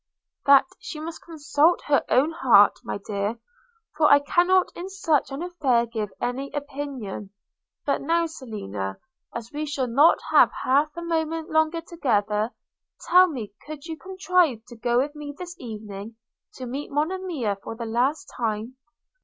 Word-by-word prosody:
'That 275 -1 +8
she 305 - -7
must 325 +1 -7
consult 320 0 +1
her 290 -1 +2
own 280 +6 +3
heart, 240 -10 +5
my - - -3
dear; 205 +2 -2 0.6
for 300 -1 +4
I 285 - +9
cannot 355 +6 +3
in 360 +2 -6
such 330 -7 +1
an 275 +5 -4
affair 275 -10 +1
give 220 -3 -4
any 260 +3 -2
opinion. 275 -9 -5 0.6
But - - 0
now, 335 +1 +2
Selina, 200 - -5 0.4
as 235 0 -6
we 300 +1 -3
shall 280 -3 -1
not 275 +7 +5
have - - +7
half 285 +4 +3
a 340 - -4
moment 325 -1 -2
longer 315 +1 +2
together, 215 -10 0 0.6
tell 365 +1 +8
me, 235 - -6
could 305 -1 -8
you 325 -1 -5
contrive 360 - +1
to 240 - -10
go 240 +1 0
with 280 +4 +1
me 295 -1 -8
this 355 -1 -7
evening 215 -2 -8 0.4
to 255 - -6
meet 270 +4 -5
Monimia 305 - -1
for 225 - -7
the 230 0 -5
last 245 +7 0
time?' 225 +2 -3
285 Hz, 155 wpm, -25 LUFS, 230-325 Hz, 0.6 s, I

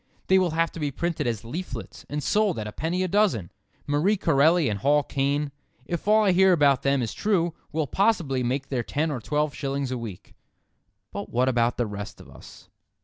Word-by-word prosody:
They 190 0 +6
will 185 -2 +2
have 165 0 +2
to - - -9
be 150 -2 -1
printed 170 +1 -2
as 115 -1 -3
leaflets 170 +10 -7
and 150 0 -3
sold 210 -4 +2
at 110 - -3
a 105 - -5
penny 165 - -2
a - - 0
dozen. 180 - +1 0.3
Marie 155 +9 +2
Corelli 165 -1 +3
and 105 -2 -2
Hall 145 +5 +3
Caine—if 145 +3 -3
all 215 +1 +5
I 200 - +4
hear 190 +1 +5
about 140 -5 +4
them 140 -2 +1
is 115 - -3
true—will 170 -5 -1
possibly 165 - +1
make 130 +3 -2
their 130 -3 -1
ten 150 +6 -1
or 135 - -3
twelve 150 +3 -1
shillings 140 -1 -3
a 125 - -2
week. 105 -6 -9 0.8
But - - -6
what 125 +2 +1
about 120 -2 +1
the 120 - +1
rest 105 -1 -7
of - - -14
us? - - -14
145 Hz, 200 wpm, -25 LUFS, 125-175 Hz, 0.8 s, They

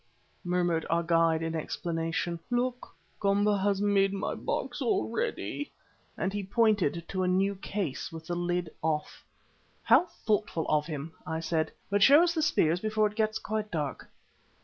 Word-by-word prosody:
murmured 175 -2 +1
our 170 +1 +2
guide 165 -1 +3
in 165 0 -2
explanation. 165 +1 -2
"Look, 245 -2 -2 0.2
Komba 205 0 +2
has 200 0 +1
made 200 -1 +3
my 195 - -2
box - - -3
ready," 415 -6 -1 0.5
and 190 - -1
he 205 - -1
pointed 195 -5 +2
to 185 - -2
a 185 - +1
new 190 +2 +2
case 190 -6 -4
with 160 0 -9
the 175 - -3
lid 175 -1 -1
off. 155 -1 -2 0.6
"How 360 - +5
thoughtful 210 - -1
of 150 0 +2
him!" 155 0 -5 0.2
I 160 0 -2
said. 160 -1 -1 0.2
"But 205 0 +2
show 285 - +8
us 345 -1 +2
the 325 - 0
spears 170 - +2
before 215 +1 +1
it 210 0 -2
gets 215 -1 +1
quite 215 0 -3
dark." 150 -6 -4
185 Hz, 160 wpm, -29 LUFS, 165-210 Hz, 0.6 s, show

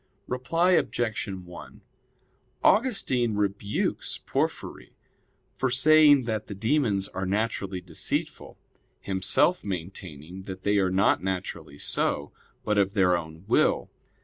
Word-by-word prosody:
Reply 165 +9 +1
Obj. 120 -11 0
1: 90 -2 -9 0.8
Augustine 130 - +2
rebukes 100 0 -1
Porphyry - - -3 0.6
for 130 - 0
saying 145 +1 +6
that 110 -3 -3
the 100 - -6
demons 110 -3 +1
are 95 0 -4
naturally 100 -2 -2
deceitful; 85 -3 -3 0.4
himself 95 - +1
maintaining 90 -2 -7
that 95 -1 -8
they 100 0 +2
are 95 -1 +2
not 95 +2 +2
naturally 90 -6 -5
so, - - -1 0.3
but 105 -1 +1
of 100 +1 +1
their 90 -3 +4
own 80 0 -6
will. - - +2
100 Hz, 115 wpm, -26 LUFS, 95-120 Hz, 0.8 s, saying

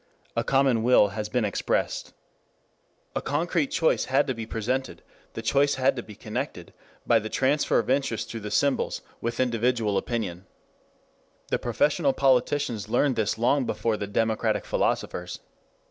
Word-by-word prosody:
A - - +1
common 135 -4 +3
will 115 -3 +5
has 105 +1 -4
been 125 -1 +1
expressed. 100 - -1 1.0
A - - 0
concrete 155 +1 0
choice 160 - +2
had 135 +2 +2
to 130 - -1
be 115 -2 -6
presented, 125 +4 -3 0.3
the 115 - -6
choice 140 +5 +3
had 135 0 +2
to 120 - -3
be 105 -3 -12
connected, 110 - -5 0.3
by 115 - +4
the 110 0 -6
transfer 140 +5 +2
of 115 - 0
interest 130 -5 0
through 115 - -5
the 105 -1 -6
symbols, 140 +4 0 0.2
with 115 0 -3
individual 120 -4 +1
opinion. 95 -6 -4 1.0
The - - 0
professional 140 - +1
politicians 130 -4 +1
learned 130 +3 +2
this 110 -1 0
long 125 +3 +2
before 115 -2 0
the 100 -1 -4
democratic 110 +2 0
philosophers. 90 0 -1
120 Hz, 150 wpm, -26 LUFS, 110-135 Hz, 1.0 s, will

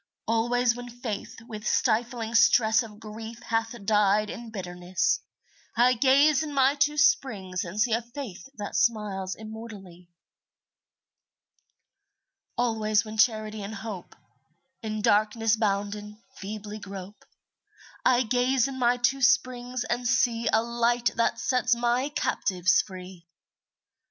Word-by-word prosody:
Always 235 +2 +2
when 245 0 -8
Faith 240 -4 -6
with 215 -3 -8
stifling 230 -1 0
stress 230 0 +5
Of 215 -3 -10
grief 225 +1 -9
hath 225 +1 -1
died 210 0 +3
in 235 -1 -8
bitterness, 180 - -1 0.6
I 245 +2 +5
gaze 275 +4 +4
in 300 -2 -5
my 270 0 +4
two 295 +1 +1
springs 210 - +1
and 185 +4 -6
see 230 +1 +2
A 230 - +1
Faith 240 -2 -9
that 205 -1 -6
smiles 205 -4 0
immortally. 210 -5 -10 2.5
Always 220 -3 +1
when 215 0 -7
Charity 215 -1 +2
and 200 +2 -6
Hope, 200 -3 -8 0.7
In 215 -2 -4
darkness 215 +2 +3
bounden, 210 0 -2 0.2
feebly 210 0 -7
grope, 195 0 -9 0.8
I 255 0 +4
gaze 250 +2 +2
in 265 -1 -6
my 245 0 +3
two 265 +2 +1
springs 250 -1 +1
and 245 0 -2
see 235 -2 +1
A 220 +1 +3
Light 235 +1 +1
that 230 - +1
sets 250 -1 +1
my 240 +3 0
captives 185 - +1
free. 185 -2 -11
225 Hz, 125 wpm, -27 LUFS, 210-245 Hz, 2.5 s, stress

